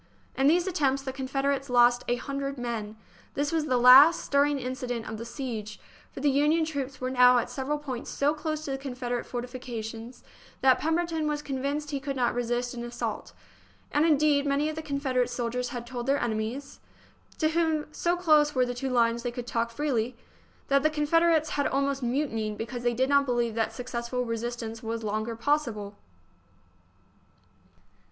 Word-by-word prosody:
In 270 +1 +3
these 345 +4 +4
attempts 275 -8 0
the 265 -1 -4
Confederates 275 +1 -1
lost 245 0 +4
a 245 - +2
hun 275 +3 -5
dred 275 0 -3
men. 225 -3 -4 0.4
This 285 +1 0
was 320 -2 0
the 255 - +2
last 265 +7 +8
stirring 285 0 +2
incident 250 -2 -4
of 220 0 -6
the 230 - -6
siege, 230 -4 -6 0.3
for - - -8
the 290 - +3
Union 300 +4 +3
troops 280 -4 -4
were 255 0 -2
now 250 -1 +6
at 240 - -1
several 280 +2 -2
points 265 -5 -6
so 285 +2 +1
close 310 0 -4
to 275 - -3
the 270 - -3
Confederate 250 -3 -4
fortifications 240 -1 -6 0.4
that 260 -1 +5
Pemberton 325 -1 0
was 295 0 -2
convinced 285 +2 -3
he 280 - -2
could 275 0 -4
not 245 -2 +1
resist 245 +1 -1
an 240 -1 -6
assault; 240 0 -5 0.6
and, 295 - +3
indeed, 295 -2 +3
many 285 +2 +1
of 310 - -5
the 315 - -4
Confederate 280 -4 -1
soldiers 245 +1 -2
had 240 -3 -6
told 245 0 -6
their 280 +1 +2
enemies 225 +5 -3 0.6
(to 310 - +2
whom, 320 -2 +1
so 345 +3 0
close 305 -4 +4
were 255 -1 +3
the 245 - -3
two 265 +2 -3
lines, 235 -1 +2
they 245 - -2
could 240 0 -6
talk 230 -1 -1
freely) 245 -3 -1 0.5
that 275 0 +3
the 310 - +3
Confederates 315 +1 +2
had 285 - 0
almost 275 0 0
mutinied 235 -5 -1
because 240 +2 -5
they 240 -1 0
did 260 +2 +2
not 280 0 +3
believe 240 -2 0
that 225 0 0
successful 250 0 -4
resistance 230 0 -4
was 225 -1 -4
longer 215 +2 -2
possible. 230 -6 -1
260 Hz, 180 wpm, -27 LUFS, 240-290 Hz, 0.6 s, last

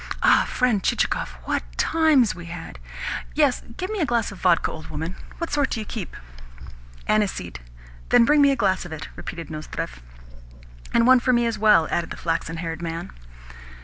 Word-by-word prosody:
Ah, - - +5
friend 245 -6 +1
Chichikov, 65 - 0
what - - -1 0.2
times 310 -9 +3
we 175 -1 -10
had! 165 - -8 0.6
Yes, 285 -4 +3 0.2
give 370 +3 -3
me 430 - -2
a 325 - +2
glass 235 -3 0
of 200 - -11
vodka, 175 -3 +3
old 155 - -9
woman. 160 +4 -5 0.2
What 335 - -4
sort 290 -2 +2
do 230 - -2
you 215 - -4
keep?" 205 -4 -6 0.9
"Aniseed." 210 - 0 0.5
"Then 235 - +6
bring 295 +3 +5
me 280 - +6
a 275 - +3
glass 190 -6 +1
of 175 - -9
it," 160 -1 -6
repeated 170 -2 -7
Nozdrev. 155 - -6 0.9
"And 230 - +3
one 255 0 +7
for 255 +1 +2
me 240 -1 +3
as 230 -2 -1
well," 210 -7 +5
added 170 -1 -1
the - - -7
flaxen 165 0 -2
haired 165 0 -4
man. 165 0 -5
205 Hz, 180 wpm, -24 LUFS, 165-250 Hz, 0.9 s, one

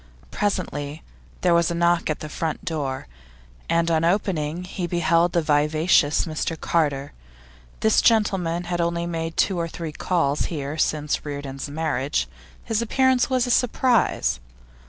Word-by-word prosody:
Presently 150 -7 -2 0.4
there 180 -2 +3
was 170 -1 +3
a 170 - -2
knock 170 -1 +2
at 155 - -2
the 155 - -5
front 155 +1 -4
door, 145 -5 -3 0.6
and 170 0 +2
on 160 0 +2
opening 170 -3 0
he 180 -1 -4
beheld 170 0 +2
the 170 - +2
vivacious 150 +1 +3
Mr 160 0 -3
Carter. 145 -4 0 0.7
This 220 0 +4
gentleman 190 -7 +2
had 175 0 -2
only 170 0 -1
made 165 -1 -4
two 190 -3 +2
or 165 - -1
three 165 -1 -6
calls 150 -3 0
here 145 -3 -4
since 150 -1 0
Reardon's 140 -1 -5
marriage; 150 -2 -1 0.4
his 225 -1 -1
appearance 260 +2 +2
was 255 -1 +2
a 245 - -1
surprise. 230 - +2
165 Hz, 145 wpm, -23 LUFS, 150-180 Hz, 0.7 s, This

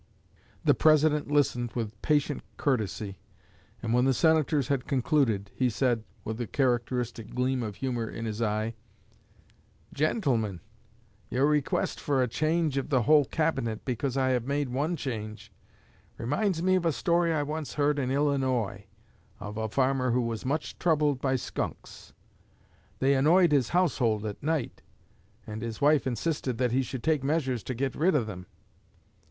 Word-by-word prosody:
The - - +6
President 155 -1 +3
listened 125 -5 +1
with 110 -3 -4
patient 145 -1 +1 0.2
courtesy, 110 -6 -1 0.6
and 115 0 -1
when 125 +1 +3
the 135 -1 +3
Senators 155 -4 +3
had 135 -3 -1
concluded, 125 -7 +1
he 130 -1 +1
said, 120 -1 0 0.2
with 110 +2 -4
a 120 - -3
characteristic 120 -3 -1
gleam 130 0 0
of 105 -3 -4
humor 120 -3 -2
in 115 - -6
his 110 0 -4
eye: 110 +1 0 1.2
"Gentlemen, 130 - 0 0.7
your 130 +3 +2
request 150 -1 0
for 135 -3 +1
a - - +1
change 155 +2 0
of 135 - -5
the 130 -5 +2
whole 150 +3 +5
Cabinet 135 -8 -1
because 130 +1 -2
I 130 -1 +2
have 125 -1 0
made 140 -1 0
one 145 +7 -1
change, 110 -7 -6 0.7
reminds 165 - -1
me 185 0 +3
of 185 -2 +2
a - - +3
story 170 +2 +1
I 155 -2 +1
once 150 0 -5
heard 145 0 +2
in 130 -2 -1
Illinois 130 -8 0 0.5
of 105 0 -7
a 110 0 -2
farmer 130 +1 +1
who 125 +1 +2
was 115 -2 -3
much 150 +3 -2
troubled 150 -5 +2
by 130 -1 +1
skunks. 130 - -5 0.9
They 135 +1 +3
annoyed 165 +5 +4
his 135 -5 +3
household 125 - +1
at 105 -2 -5
night, 155 -4 -2 0.6
and 110 0 -6
his 115 -1 -5
wife 145 -1 +3
insisted 130 0 -2
that 125 -1 +1
he 130 +2 +2
should 130 -1 -5
take 155 -3 +1
measures 135 -5 0
to 130 - -3
get 130 +2 -1
rid 170 +3 +2
of 125 -6 +2
them. 90 -4 -8
130 Hz, 160 wpm, -28 LUFS, 115-150 Hz, 1.2 s, The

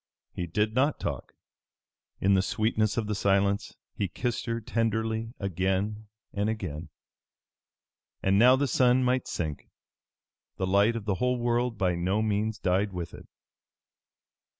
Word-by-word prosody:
He 90 - -4
did 105 +6 0
not 140 +5 +2
talk. - - -4 0.9
In 100 +1 +3
the 95 - +4
sweetness 110 +1 0
of 115 - 0
the 105 - -2
silence 100 0 +1 0.2
he 100 - -1
kissed 120 +6 -3
her 115 0 -1
tenderly 115 +1 -1
again 100 +3 -1 0.3
and 100 +1 0
again. 90 -7 -4 1.3
And 95 +1 +3
now 125 +3 +7
the 140 +2 +1
sun 130 0 +3
might 125 0 +1
sink. 75 -4 -4 0.9
The 95 - -1
light 100 +5 +3
of 115 -3 -5
the 105 - +1
whole 125 0 +2
world 120 -1 0
by 90 -2 +1
no 95 +5 0
means 110 0 0
died 95 +1 +1
with 90 -2 -5
it. - - -12
105 Hz, 145 wpm, -28 LUFS, 95-115 Hz, 1.3 s, now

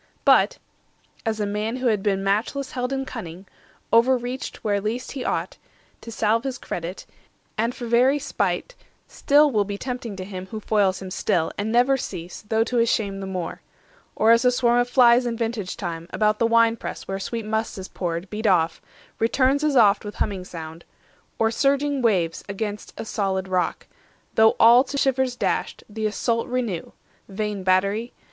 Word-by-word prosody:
But—as 220 -1 0
a 210 - 0
man 210 +3 -2
who 255 0 -4
had 215 -4 +2
been 195 -1 0
matchless 220 +8 -1
held 250 -1 -2
10 270 0 -2
In - - -5
cunning, 190 -7 -8 0.5
over 245 +3 +5
reached 245 +2 -6
where 205 -2 0
least 225 +5 -3
he 275 - -5
thought, - - -2 0.4
To 230 - -9
salve 225 +1 +1
his 265 -1 -3
credit, 175 -2 -6 0.5
and 230 +3 -1
for 245 - -6
very 245 +4 +4
spite, 395 - -2 0.3
Still 290 +1 +3
will 210 -4 +2
be 200 0 -5
tempting 245 -4 -5
him 185 0 -7
who 215 +3 -6
foils 200 -3 +1
him 185 - -7
still, 175 -4 0
And 210 +2 -2
never 250 +3 +4
cease, 180 -8 -6
though 220 0 +3
to 245 +1 -2
his 230 -1 +3
shame 200 -3 -1
the 195 - -5
more; 180 -3 -5 0.5
Or 220 +1 +4
as 230 +1 +5
a 250 - +5
swarm 245 -1 +2
of 245 0 +1
flies 245 -1 +5
in 230 -1 -2
vintage 225 -5 -3
time, 170 -3 -5
About 215 0 +1
the 230 - +3
wine 230 0 +4
press - - -7
where 195 0 -3
sweet 225 +3 -4
must 220 0 -2
is 190 0 -6
poured, 170 0 -4
Beat 215 +1 -2
off, 165 -4 +2 0.4
returns 260 +5 +2
as 300 -2 +1
oft 205 -4 +5
with 205 0 -7
humming 195 -3 -2
sound; 165 -1 -9 0.5
Or 225 0 +2
surging 280 +2 +1
waves 180 -8 +1
against 205 +1 -4
a - - -5
solid 190 -3 -1
rock, 185 -1 -1 0.5
Though 220 0 +5
all 235 +3 +7
to 280 +1 -5
shivers 265 -2 +1
dashed, - - -2
the 215 0 -2
assault 230 +2 -1
renew, 235 -9 -3 0.4
(Vain 205 0 -3
battery!) 195 +5 +1
220 Hz, 180 wpm, -23 LUFS, 195-245 Hz, 0.5 s, all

